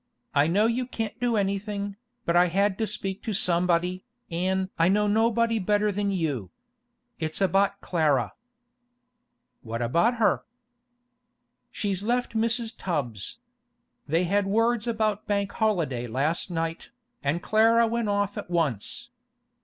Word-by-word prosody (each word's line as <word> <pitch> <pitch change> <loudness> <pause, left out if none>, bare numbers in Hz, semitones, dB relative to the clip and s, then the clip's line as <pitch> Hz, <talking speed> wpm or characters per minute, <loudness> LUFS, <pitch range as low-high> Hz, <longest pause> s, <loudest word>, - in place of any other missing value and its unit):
'I 145 +1 +4
know 200 +6 +3
you 240 +2 0
can't 225 -2 -4
do 245 -2 +1
anything, 200 0 -2 0.3
but 170 - +1
I 175 +1 +6
had 195 +3 +2
to 220 - 0
speak 195 -1 -3
to 220 - -3
somebody, 180 0 +1 0.3
an' 190 +2 0
I 165 - +5
know 210 +2 +3
nobody 225 +2 +2
better 210 +2 +2
than 200 +1 -1
you. 145 - -2 0.7
It's 155 -1 -3
about 200 +1 +2
Clara.' 145 - +1 1.3
'What 115 0 -4
about 170 - +2
her?' 225 -2 +2 1.3
'She's 195 -3 -2
left 245 +4 0
Mrs. 230 0 +1
Tubbs. 125 - -3 0.7
They 165 +4 +2
had 200 +3 +1
words 230 +2 +1
about 215 -3 0
Bank 200 -1 0
holiday 165 - 0
last 145 +10 -1
night, 165 -1 -3 0.3
an' 145 +4 +1
Clara 225 +3 +4
went 230 -1 -1
off 205 +1 0
at 205 - -8
once. 165 - -1
200 Hz, 135 wpm, -26 LUFS, 170-220 Hz, 1.3 s, I